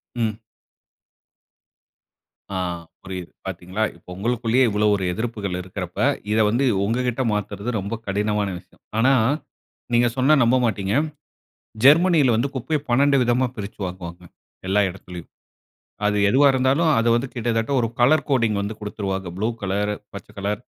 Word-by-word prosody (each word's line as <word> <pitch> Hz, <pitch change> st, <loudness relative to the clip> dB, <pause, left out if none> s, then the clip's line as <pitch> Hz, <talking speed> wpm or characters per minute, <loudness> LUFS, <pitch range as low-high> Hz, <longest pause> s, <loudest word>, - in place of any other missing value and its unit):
ம். 110 Hz, -2 st, -1 dB, 2.1 s
ஆ, -, -, -1 dB, 0.5 s
புரியுது. 90 Hz, -2 st, -7 dB, 0.2 s
பாத்தீங்களா, 95 Hz, +3 st, -4 dB
இப்போ 85 Hz, -, -16 dB
உங்களுக்குள்ளயே 120 Hz, +3 st, +1 dB
இவ்வளவு 105 Hz, 0 st, +2 dB
ஒரு 95 Hz, -, -3 dB
எதிர்ப்புகள் 105 Hz, -4 st, -3 dB
இருக்கிறப்ப, 95 Hz, 0 st, -7 dB, 0.3 s
இத 110 Hz, -, +2 dB
வந்து 120 Hz, +5 st, +1 dB, 0.2 s
உங்ககிட்ட 125 Hz, +3 st, 0 dB
மாத்துறது 105 Hz, +2 st, -3 dB
ரொம்ப 100 Hz, +4 st, -4 dB
கடினமான 105 Hz, +1 st, 0 dB
விஷயம். -, -, -22 dB, 0.2 s
ஆனா, 130 Hz, +4 st, +4 dB, 0.8 s
நீங்க 120 Hz, 0 st, +4 dB
சொன்னா 130 Hz, +4 st, +3 dB
நம்பமாட்டீங்க. 115 Hz, -5 st, +1 dB, 0.9 s
ஜெர்மனில 150 Hz, -5 st, +6 dB
வந்து, 130 Hz, +5 st, 0 dB
குப்பைய 150 Hz, +4 st, -1 dB
12 140 Hz, +3 st, +4 dB
விதமா 125 Hz, +2 st, +2 dB
பிரிச்சு 105 Hz, 0 st, -7 dB
வாங்குவாங்க. 90 Hz, -1 st, -7 dB, 0.4 s
எல்லா 100 Hz, +2 st, +3 dB
இடத்திலயும். 90 Hz, -2 st, -10 dB, 0.8 s
அது 105 Hz, 0 st, +2 dB
எதுவா 140 Hz, +4 st, +5 dB
இருந்தாலும், 130 Hz, +5 st, +2 dB
அது 115 Hz, -, +1 dB
வந்து 120 Hz, +3 st, -1 dB
கிட்டத்தட்ட 115 Hz, +1 st, -1 dB
ஒரு 115 Hz, -, +1 dB
கலர் 140 Hz, +6 st, +4 dB
கோடிங் 115 Hz, -6 st, +2 dB
வந்து 105 Hz, +2 st, -4 dB
குடுத்துருவாங்க, 95 Hz, -3 st, -4 dB
ப்ளூ 110 Hz, +3 st, 0 dB, 0.2 s
கலர், 100 Hz, +2 st, 0 dB, 0.2 s
பச்ச 100 Hz, -, -9 dB
கலர் 100 Hz, +1 st, -2 dB
110 Hz, 130 wpm, -22 LUFS, 100-125 Hz, 2.1 s, ஜெர்மனில